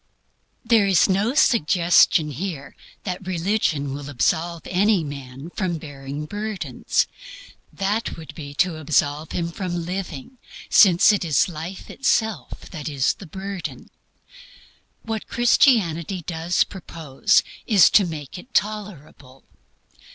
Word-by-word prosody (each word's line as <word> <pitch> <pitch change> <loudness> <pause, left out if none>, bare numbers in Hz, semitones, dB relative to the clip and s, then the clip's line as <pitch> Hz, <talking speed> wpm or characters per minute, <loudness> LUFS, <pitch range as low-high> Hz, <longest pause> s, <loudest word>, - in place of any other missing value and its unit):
There 220 -4 +4
is 190 -3 +4
no 205 +7 +1
suggestion 170 - +4
here 145 -2 -6 0.3
that 185 -1 -5
religion 170 -6 0
will 145 0 -7
absolve 160 +7 -1
any 195 0 +2
man 140 +1 -8
from 180 -4 -2
bearing 145 -1 -7
burdens. 210 +3 -2 0.7
That 205 +3 -2
would 160 -1 -10
be 145 -3 -9
to 175 0 +1
absolve 150 0 0
him 170 -1 -2
from 175 -2 -4
living, 185 - -6 0.3
since 185 0 +7
it 200 - 0
is 160 -4 +2
life 170 +2 -7
itself 220 -5 -1
that 155 -4 -5
is 140 -3 +1
the 190 - -12
burden. 190 +2 -7 1.1
What 225 -1 -4
Christianity 195 - +2
does 170 +1 +1
propose 160 -7 0 0.2
is 205 -5 +6
to 205 - +6
make 155 -2 -6
it 250 +7 -16
tolerable. 170 -11 -3
175 Hz, 120 wpm, -22 LUFS, 150-200 Hz, 1.1 s, since